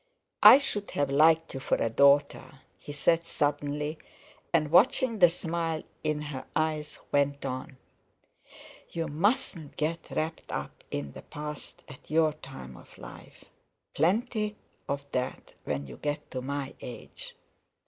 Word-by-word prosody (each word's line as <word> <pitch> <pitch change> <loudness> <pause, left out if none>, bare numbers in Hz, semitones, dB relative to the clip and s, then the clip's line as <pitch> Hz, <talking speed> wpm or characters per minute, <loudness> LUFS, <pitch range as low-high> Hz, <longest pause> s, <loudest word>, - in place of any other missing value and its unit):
"I - - +11
should 210 -8 -3
have 145 -1 +1
liked 160 +3 +4
you 135 - -4
for 135 - +1
a - - 0
daughter," 140 +1 +3 0.2
he - - -9
said 165 +3 +2
suddenly; 145 +1 -1 0.5
and 155 -3 +2
watching 225 +5 +4
the 175 -2 +8
smile 165 -1 -2 0.2
in 150 -1 0
her 130 - -5
eyes, 155 -1 -1
went 140 0 +1
on: 130 +1 -5 1.1
"You 165 -1 -3
mustn't 170 - -1
get 160 +2 -2
wrapped 160 +1 -3
up - - -5
in 70 -1 -4
the - - -10
past 150 -1 -8
at - - -14
your 155 -1 +3
time 135 - -10
of - - -16
life; - - -12 0.5
plenty 210 - +1 0.3
of 140 0 -2
that 125 0 -3
when 70 +1 -2
you 65 -3 -10
get 145 0 -4
to 130 - -3
my 140 +1 -4
age. 120 - -9
150 Hz, 140 wpm, -29 LUFS, 140-165 Hz, 1.1 s, I